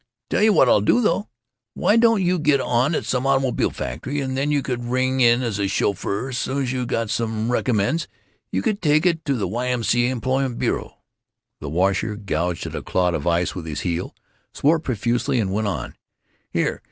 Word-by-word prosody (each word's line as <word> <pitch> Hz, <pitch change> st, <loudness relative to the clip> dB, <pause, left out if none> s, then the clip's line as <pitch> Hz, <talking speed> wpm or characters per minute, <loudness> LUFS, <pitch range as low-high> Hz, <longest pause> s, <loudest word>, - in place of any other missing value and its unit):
"Tell -, -, +2 dB
you 215 Hz, +1 st, +5 dB
what 135 Hz, -, +5 dB
I'll 105 Hz, -, +5 dB
do, 105 Hz, -, +3 dB
though. 215 Hz, -2 st, 0 dB, 0.5 s
Why 210 Hz, -, +2 dB
don't 230 Hz, -3 st, +4 dB
you 180 Hz, 0 st, +1 dB
get 150 Hz, -2 st, +3 dB
on 130 Hz, +5 st, +1 dB
at -, -, -2 dB
some 125 Hz, +2 st, 0 dB
automobile 135 Hz, -2 st, +1 dB
factory, 145 Hz, +3 st, -4 dB
and 130 Hz, -1 st, -2 dB
then 140 Hz, +2 st, 0 dB
you 145 Hz, -2 st, +1 dB
could 125 Hz, -2 st, -3 dB
ring 130 Hz, +1 st, +1 dB
in 120 Hz, 0 st, +4 dB
as 110 Hz, -4 st, -2 dB
a 100 Hz, -, +1 dB
chauffeur, 100 Hz, +5 st, -1 dB
soon 130 Hz, +2 st, -1 dB
's 125 Hz, -, -2 dB
you 125 Hz, -2 st, -2 dB
got 115 Hz, -2 st, -1 dB
some 115 Hz, 0 st, -1 dB
recommends 125 Hz, +6 st, 0 dB, 0.4 s
you 95 Hz, -, -1 dB
could 205 Hz, -, -1 dB
take 155 Hz, -1 st, +3 dB, 0.2 s
to 140 Hz, -, +1 dB
the 110 Hz, -, -1 dB
Y. 125 Hz, +2 st, -2 dB
M. 125 Hz, -2 st, -1 dB
C. 120 Hz, +1 st, +2 dB
A. -, -, 0 dB
employment 130 Hz, +1 st, -1 dB
bureau." -, -, -2 dB, 0.6 s
The 75 Hz, -, -6 dB
washer 95 Hz, +6 st, 0 dB
gouged 90 Hz, -4 st, -2 dB
at -, -, -6 dB
a -, -, -3 dB
clot 90 Hz, -1 st, 0 dB
of 85 Hz, -, -3 dB
ice 85 Hz, +1 st, +1 dB
with 85 Hz, -3 st, -7 dB
his 75 Hz, -2 st, -4 dB
heel, 85 Hz, 0 st, -3 dB, 0.4 s
swore 160 Hz, +3 st, +3 dB
profusely, 120 Hz, 0 st, -1 dB
and 95 Hz, -4 st, -1 dB
went 105 Hz, +1 st, 0 dB
on: 95 Hz, -, -4 dB, 0.6 s
"Here. -, -, -1 dB
125 Hz, 205 wpm, -22 LUFS, 105-135 Hz, 0.6 s, you